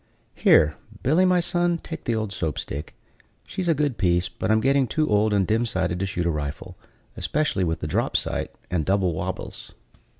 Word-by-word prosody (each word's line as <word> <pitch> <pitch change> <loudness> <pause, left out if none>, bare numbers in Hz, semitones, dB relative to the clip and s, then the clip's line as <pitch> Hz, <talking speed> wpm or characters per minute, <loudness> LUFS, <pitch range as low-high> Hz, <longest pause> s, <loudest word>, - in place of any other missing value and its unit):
Here, 75 0 +4 0.3
Billy, 160 +8 +4
my 180 -1 +4
son, 175 0 +1
take 160 -1 -8
the 120 - +1
old 110 -2 -2
Soap 80 -5 -2
stick; 75 +3 -5 0.5
she's 185 -2 -4
a 165 - +3
good 145 -5 -1
piece, 90 -2 +2
but - - -4
I'm 110 0 +4
getting 135 +2 +3
too 155 +3 0
old 105 +1 +3
and 100 -2 +2
dim 110 +3 +1
sighted 90 -4 -1
to 95 - -1
shoot 90 -2 -2
a 85 - +2
rifle, 75 -2 -5 0.4
especially 150 -10 0
with 80 -2 -1
the - - -2
drop - - +1
sight - - -2 0.2
and 90 -3 +1
double 95 0 +1
wabbles." 80 - -5
105 Hz, 195 wpm, -24 LUFS, 90-145 Hz, 0.5 s, Here